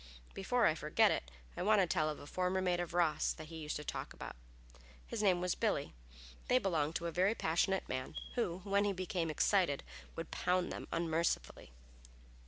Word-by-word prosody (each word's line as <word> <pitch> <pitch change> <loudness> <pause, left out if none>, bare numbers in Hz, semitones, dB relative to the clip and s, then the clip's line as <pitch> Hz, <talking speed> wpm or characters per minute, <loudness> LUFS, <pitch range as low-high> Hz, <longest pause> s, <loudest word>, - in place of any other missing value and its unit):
Before - - +1
I - - +5
forget - - +3
it, 65 - -2 0.3
I - - -4
want 210 +3 +4
to 190 - +5
tell 160 -3 +1
of 150 - -4
a - - -10
former 185 +4 0
mate 180 -2 +1
of 175 -1 -3
Ross 165 -4 +2
that 155 0 -10
he 165 - -7
used 155 -1 -4
to 150 - -4
talk - - -5
about. - - -8 0.7
His - - -3
name 185 -4 +3
was 180 -1 +1
Billy. - - 0 0.5
They 250 - +5
belonged 165 -8 0
to 170 - -2
a 170 - -1
very 185 +6 +2
passionate 190 +3 +1
man, 130 0 -4 0.2
who, 185 -7 -1
when 200 0 +2
he 205 -1 +1
became 180 -2 -2
excited, 155 -1 +2 0.3
would 165 0 -6
pound 180 0 +1
them - - -6
unmercifully. 165 - -1
175 Hz, 190 wpm, -35 LUFS, 160-190 Hz, 0.7 s, I